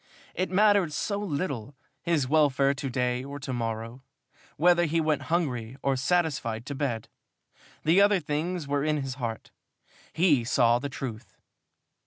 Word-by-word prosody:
It 185 - -1
mattered 200 -4 +3
so 200 +7 -2
little, 145 - -3 0.3
his 160 -6 +1
welfare 140 -2 +3
of - - -3
to 135 -1 -3
day 125 0 -1
or 140 +1 -7
to 135 -1 -5
morrow 115 +1 -4 0.6
whether 175 +2 +4
he 165 +1 +1
went 155 -2 +1
hungry 130 -8 -1
or 135 -1 +2
satisfied 130 -7 0
to 140 - -5
bed! 135 -6 -2 0.8
The 170 +5 +5
other 205 -1 +4
things 165 +1 -3
were 140 0 0
in 150 -2 0
his 135 -1 -4
heart. 115 -2 -4 0.6
He 160 -7 +3
saw 120 0 +3
the 140 +2 -4
truth. 120 -3 -7
140 Hz, 155 wpm, -27 LUFS, 125-165 Hz, 0.8 s, The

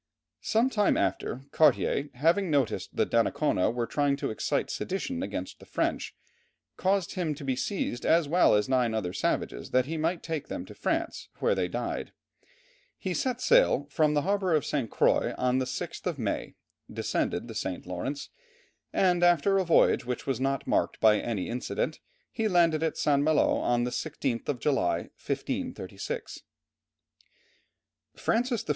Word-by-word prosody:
Some 235 +4 +2
time 210 -4 +2
after, 130 - -1
Cartier, 145 -1 +3
having 165 +8 +2
noticed 140 -6 0
that - - 0
Donnacona 90 - +2
was 120 0 -2
trying 145 -1 +1
to 140 - -3
excite 110 - -1
sedition 250 +7 -3
against - - -5
the - - -14
French, - - -2 0.6
caused 190 -1 0
him 170 -6 -1
to 145 - -9
be 130 -1 0
seized, 130 - -2
as 165 -2 +3
well 170 -6 +4
as 105 0 +2
nine 125 -4 +1
other 90 -5 -2
savages, 95 - -2
that 130 0 +2
he 160 +3 -4
might 165 +2 -1
take 160 -3 -4
them - - -5
to - - -11
France, - - -2
where - - +2
they - - 0
died. - - -4 0.8
He 190 -3 -3
set 255 +5 -1
sail - - +4
from 150 -1 +2
the 145 - +2
harbour 190 -3 +1
of 150 - +1
St. 135 -7 -1
Croix - - +2
on 125 0 +1
the 130 - 0
6th 160 +9 -5
of 170 -5 -2
May, 110 -6 -3 0.4
descended 100 - -1
the 115 - -7
St. 95 -4 -4
Lawrence, 90 +11 -4 0.6
and 180 -2 +2
after 175 +3 +4
a - - +2
voyage 170 -5 +4
which 125 -1 -4
was 135 -3 -1
not 135 0 -1
marked - - 0
by 105 -1 +5
any 105 -5 -2
incident, 125 +2 -2 0.3
he 225 -1 0
landed 170 -5 +3
at 160 -1 -1
St. 140 -2 +2
Malo 155 0 +3
on 120 0 +1
the 125 - -2
16th 135 -6 -3
of 135 -4 -1
July, 90 - 0
1536. 255 - -4 1.8
Francis 240 0 0
I. - - -11
150 Hz, 165 wpm, -28 LUFS, 125-180 Hz, 1.8 s, by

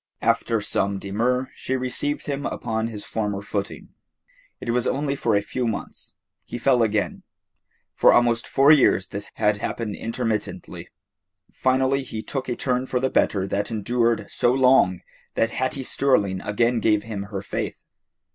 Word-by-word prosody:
After 115 0 +2
some 100 -1 0
demur 120 +7 -1
she 130 - -3
received 130 +3 -2
him 140 -1 -2
upon 110 0 -2
his 105 -3 -7
former 105 -3 -2
footing. 100 -1 -4 0.7
It 120 - -3
was 120 0 +1
only 140 0 0
for 115 -5 +1
a 100 - +2
few 125 +3 -2
months. 110 - -5 0.3
He - - -6
fell 125 0 +3
again. 110 -2 0 0.7
For - - +5
almost 120 -1 +3
four 140 +2 +5
years 130 -10 +4
this 100 +1 -5
had 105 0 +2
happened 105 0 -3
intermittently. 115 -2 -3 0.6
Finally 130 +1 +1
he 110 -4 -6
took 135 -2 -4
a 120 - -1
turn 125 0 -1
for 125 - 0
the 130 +1 0
better 95 -2 +2
that 100 +1 -1
endured 115 +1 0
so 120 - +2
long 125 -8 +4 0.3
that 115 - +2
Hattie 130 +1 -1
Sterling 105 -9 +1
again 115 +3 +1
gave 105 -2 +2
him 100 -3 -5
her 100 -2 -5
faith. - - -3
115 Hz, 155 wpm, -24 LUFS, 105-130 Hz, 0.7 s, For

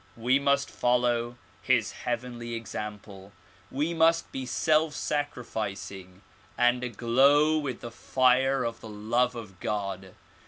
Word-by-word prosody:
We 125 +4 +2
must 140 0 +2
follow 120 -1 +1 0.2
his 120 -4 +2
heavenly 120 -1 -4
example; 105 -3 -7 0.4
we 150 +5 -1
must 165 0 +3
be 130 -1 -5
self 155 +2 +2
sacrificing 100 -9 -4 0.3
and 125 0 +3
aglow 135 +7 +3
with 135 -5 -4
the 120 - -7
fire 130 +2 +2
of 115 0 -4
the 110 - -9
love 120 +4 0
of 100 -6 -9
God. 95 -3 -4
120 Hz, 120 wpm, -28 LUFS, 110-135 Hz, 0.4 s, must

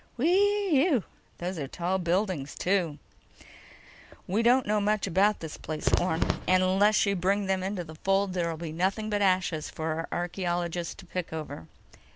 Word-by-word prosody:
"Whee 375 - +3
ew! 265 - +2 0.3
Those 180 0 -4
are 140 - -3
tall 180 +6 -1
buildings, 175 -4 -1
too." 180 -5 0 1.3
"We 200 +5 0
don't 245 +2 +4
know 210 0 +1
much 210 0 +1
about 200 +4 +2
this 160 -2 -6
place, 155 -1 -5
Orne. 170 -2 +1 0.2
And 185 0 +4
unless 200 +4 +4
you 200 0 +1
bring 195 +3 +1
them 190 -1 0
into 190 -1 -3
the 160 -1 -10
fold, 195 +3 0
there'll 170 -3 -1
be 165 -1 -5
nothing 195 +6 -1
but 205 0 0
ashes 185 -5 +1
for 160 0 -3
our 165 +1 -4 0.2
archaeologists 175 -1 -2
to - - -13
pick 180 -1 -5
over." 150 - -6
185 Hz, 170 wpm, -28 LUFS, 170-205 Hz, 1.3 s, don't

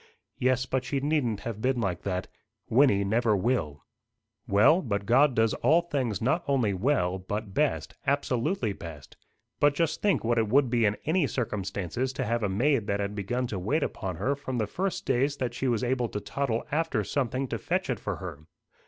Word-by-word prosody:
"Yes, 130 0 +2
but 130 0 -1
she 135 +2 -1
needn't 135 -7 0
have 115 -2 -5
been 130 +1 +1
like 95 -6 -1
that. 95 +1 -3 0.4
Wynnie 115 -5 +5
never 110 +1 +2
will." 90 - -1 0.6
"Well, 110 - +5
but 100 - -2
God 130 +3 +4
does 110 0 +3
all 155 +8 +3
things 130 - -2
not 160 +8 +1
only 125 -7 +2
well, 95 -4 +1
but 100 +2 -5
best, 150 +6 0
absolutely 140 - 0
best. 80 -6 -10 0.4
But 145 0 +4
just 165 0 0
think 205 -3 +2
what 115 0 +2
it 110 - +1
would 130 0 +3
be 120 -2 +3
in 105 0 +1
any 160 -1 +2
circumstances 105 +1 -2
to 130 -1 -2
have 115 +1 0
a 105 - 0
maid 115 +3 +1
that 100 0 0
had 100 0 -2
begun 115 +5 -2
to 105 -6 -4
wait 140 - 0
upon 95 -3 -3
her 135 +12 0
from 130 -2 -5
the 110 - +1
first 185 - -3
days 135 +2 +1
that 125 -2 -2
she 130 - -2
was 120 -2 +1
able 125 -1 0
to 105 - -3
toddle 120 0 -2
after 150 -7 0
something 130 +3 -1
to - - -3
fetch 185 +2 -1
it 125 -5 -2
for 105 - -3
her." 80 -5 -8
120 Hz, 195 wpm, -28 LUFS, 100-140 Hz, 0.6 s, Wynnie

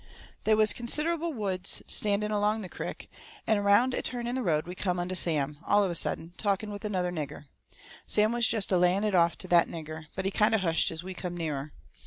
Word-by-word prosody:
They 220 - +5
was 215 0 +4
considerable 320 +7 +1
woods 195 -8 -2
standing 210 0 0
along 210 +1 +1
the 185 - -7
crick, - - -6 0.4
and 220 -2 +2
around 205 +6 +4
a - - -1
turn 240 -1 -4
in 240 - -2
the 260 - -1
road 155 -8 +1
we 175 - -6
come 180 -1 -2
onto 175 +1 -2
Sam, 150 -5 0
all 205 0 +3
of 190 - 0
a - - -2
sudden, 165 0 -2
talking 205 0 -1
with 205 0 -7
another 185 -4 -1
nigger. 150 -3 -5 0.6
Sam 215 +1 +3
was 235 -1 +3
jest 215 -4 0
a 185 - +4
laying 180 +3 +3
it 210 -2 0
off 170 -2 +3
to 185 - -5
that 175 -1 +5
nigger, 155 -1 -7
but 190 - -3
he 195 - +1
kind 215 +2 +3
of 215 - +1
hushed 165 -3 +2
as 165 +1 -6
we 185 +1 -6
come 180 -1 -5
nearer. 150 -3 -3
195 Hz, 230 wpm, -29 LUFS, 170-215 Hz, 0.6 s, They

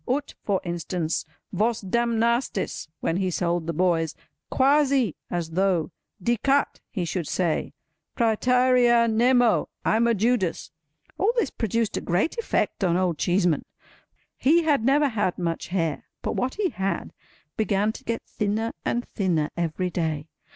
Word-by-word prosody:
Ut—for 250 -7 -1
instance, 170 -1 -2 0.3
Vos 225 +2 +1
damnastis—when 230 -6 -1
he 190 -1 0
sold 170 -1 -1
the - - 0
boys. 165 -2 +1 0.3
Quasi—as 260 - +1
though, 180 -1 +1 0.3
dicat—he 240 -3 0
should 170 -1 -3
say, 175 -4 -1 0.5
Pretærea 245 +1 +4
nemo—I'm 235 -1 +2
a 235 - +3
Judas! 205 - 0 0.5
All 405 +5 +3
this 375 - +1
produced 225 0 -1
a - - -2
great 180 - 0
effect 450 - -1
on 175 -2 +2
Old 180 -4 0
Cheeseman. 175 -3 +2 0.8
He 330 +5 +4
had 290 -7 +2
never 280 +3 +3
had 205 -6 -1
much 170 -2 -2
hair; 165 -6 -1 0.2
but - - -2
what 260 +1 -1
he 405 -3 0
had, 195 -5 -3 0.4
began 210 -1 +1
to - - -11
get 230 0 -3
thinner 215 +1 -2
and 240 0 -1
thinner 170 -7 0
every 175 +2 -2
day. 160 -3 -2
205 Hz, 130 wpm, -25 LUFS, 175-240 Hz, 0.8 s, Pretærea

